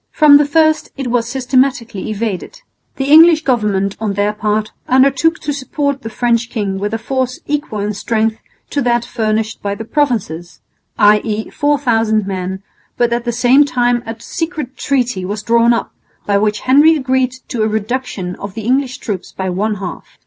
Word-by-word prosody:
From 295 -2 +7
the 290 0 +2
first 315 +1 +2
it 265 -3 -3
was 235 -1 0
systematically 255 -5 0
evaded. 215 - -4 0.3
The 270 +1 -2
English 320 0 +7
government 210 -7 0
on 215 -2 -2
their 205 +1 0
part 215 0 -1 0.2
undertook 275 +5 +3
to 290 - -2
support 280 0 -2
the 225 - -6
French 235 0 0
king 200 -5 -3
with 205 +1 -2
a - - -1
force 255 +2 -2
equal 290 -8 -3
in 210 +1 -2
strength 220 +2 -1 0.3
to 285 - 0
that 240 -1 +1
furnished 220 -2 -2
by 200 0 -2
the 225 - -7
Provinces, 215 - -2 0.4
i.e. 210 +1 +2
4000 230 -7 +1
men, 190 0 -4 0.3
but 240 -1 +2
at 235 +1 -2
the 240 - 0
same 245 +4 +4
time 245 -3 +1
a 225 0 -6
secret 320 -6 -5
treaty 250 -8 -1
was 205 +3 -4
drawn 235 +1 +3
up 235 - -1 0.3
by 200 - +1
which 210 +1 +1
Henry 290 +5 +5
agreed 260 -3 0 0.2
to 235 - -2
a 215 - +2
reduction 215 -4 -3
of 200 0 -8
the 220 - -5
English 260 +2 0
troops 200 -7 -5
by 190 -1 -3
one 210 +4 -1
half. 190 -2 -8
235 Hz, 175 wpm, -16 LUFS, 210-265 Hz, 0.4 s, From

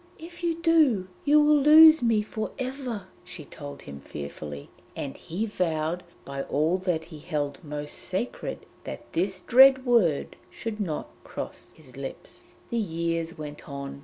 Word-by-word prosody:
'If 345 +2 -11
you 335 -1 +1
do, 310 - +3 0.2
you 295 +1 +6
will 300 0 +5
lose 315 +2 +9
me 225 -3 +2
for 215 0 -4
ever,' 255 -6 -4 0.2
she 180 -4 -10
told 145 -1 -9
him 70 0 -9
fearfully, 70 0 -8 0.2
and 135 -2 -5
he 180 +6 -4
vowed 170 -4 -1 0.2
by 140 0 -4
all 155 +7 +1
that 175 -4 -1
he 160 -2 -11
held 145 +1 -3
most 150 -1 -6
sacred 190 +7 -4 0.2
that - - -7
this 185 +2 -1
dread 265 +4 +7
word 215 - +2
should 225 -1 -6
not 170 -7 -2 0.2
cross - - -8
his - - -16
lips. - - -9 0.3
The 235 - +1
years 165 -3 -2
went 150 -1 -8
on. 140 0 -6
180 Hz, 155 wpm, -27 LUFS, 150-255 Hz, 0.3 s, lose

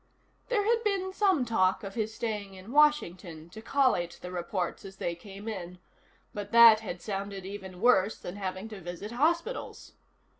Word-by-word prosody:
There 445 -5 +2
had 460 +1 +2
been 385 -3 -1
some 380 -10 +2
talk 190 -5 +2
of 195 -1 -6
his 220 -1 -2
staying 215 -4 -4
in 190 +4 -11
Washington 180 - +2
to 220 - -9
collate 230 -9 +1
the 180 - -6
reports 180 0 -3
as 195 -1 -10
they 170 - -2
came 195 +4 -11
in, 180 -5 -5 0.6
but 205 -1 -6
that 230 -2 +9
had 185 -5 -7
sounded 195 -2 -4
even 190 -2 -8
worse 220 -4 +4
than 175 - -7
having 190 +1 -4
to 210 -3 -9
visit 175 +5 -7
hospitals. 335 - -1
205 Hz, 165 wpm, -29 LUFS, 185-245 Hz, 0.6 s, that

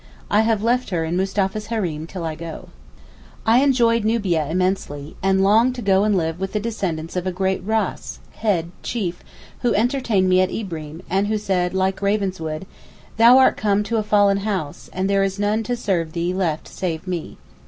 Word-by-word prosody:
I 210 - +5
have 220 -2 +1
left 245 +2 +1
her 170 -4 -1
in 165 +2 -2
Mustapha's 195 +2 -1
hareem 175 -9 -2
till 180 0 -6
I 160 - -2
go. 165 0 -8 0.8
I 225 +2 +5
enjoyed 240 -5 +3
Nubia 195 -9 +1
immensely, 175 -5 -2
and 190 0 +2
long 225 +6 +4
to 250 - -6
go 195 0 +3
and 210 -2 +2
live 165 -1 -1
with 195 0 -4
the 210 - +1
descendants 185 -8 -3
of 180 0 -2
a - - 0
great 190 +1 -1
Ras 220 +2 -2
(head, 175 -6 -1
chief,) 180 -7 -3 0.4
who 240 -2 +1
entertained 230 -4 +1
me 185 0 +4
at 185 - +1
Ibreem, 165 -5 -6
and 195 +2 +1
who 215 0 0
said, 185 -3 -1
like 190 +1 0
Ravenswood, 190 -5 -1 0.5
'Thou 235 +3 +8
art 265 - +5
come 205 -1 +1
to 230 +2 -1
a - - +2
fallen 205 -2 +3
house, 195 -8 -4
and 190 +1 -1
there 195 0 +2
is 195 0 -1
none 205 +2 +1
to 245 +2 -2
serve 175 -8 -1
thee 175 +1 -1
left 170 -5 -1
save 165 -2 -4
me. 180 -3 -5
195 Hz, 190 wpm, -21 LUFS, 175-215 Hz, 0.8 s, Thou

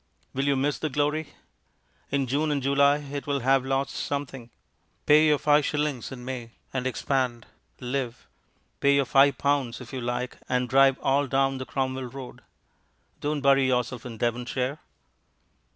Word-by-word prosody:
Will 135 +1 -1
you 140 - +3
miss 140 +2 0
the 155 - -2
glory? 150 +2 0 0.8
In 140 -1 0
June 145 +5 0
and 145 -3 -1
July 140 +1 +4
it 145 -1 -6
will 140 -1 0
have 135 +1 +3
lost 135 +1 -1
something. 135 -4 -4 0.6
Pay 155 +1 +6
your 150 -1 +4
five 150 +1 +3
shillings 145 -4 -2
in 125 -2 -8
May 120 -3 -6 0.2
and 130 -1 -1
expand, 130 -2 -1 0.3
live; 125 -1 -4 0.5
pay 140 0 +4
your 140 -1 +3
five 135 +2 +4
pounds 140 -4 0
if 125 -1 -11
you 130 - -3
like 125 +1 -3
and 125 0 +1
drive 135 +1 +5
all 140 +1 +2
down 135 0 +1
the 130 - -6
Cromwell 130 -1 -2
Road. 130 +1 -9 0.8
Don't 145 0 -2
bury 135 -1 +4
yourself 125 -1 -1
in 120 -3 -8
Devonshire. 125 +4 -2
135 Hz, 160 wpm, -26 LUFS, 125-140 Hz, 0.8 s, Pay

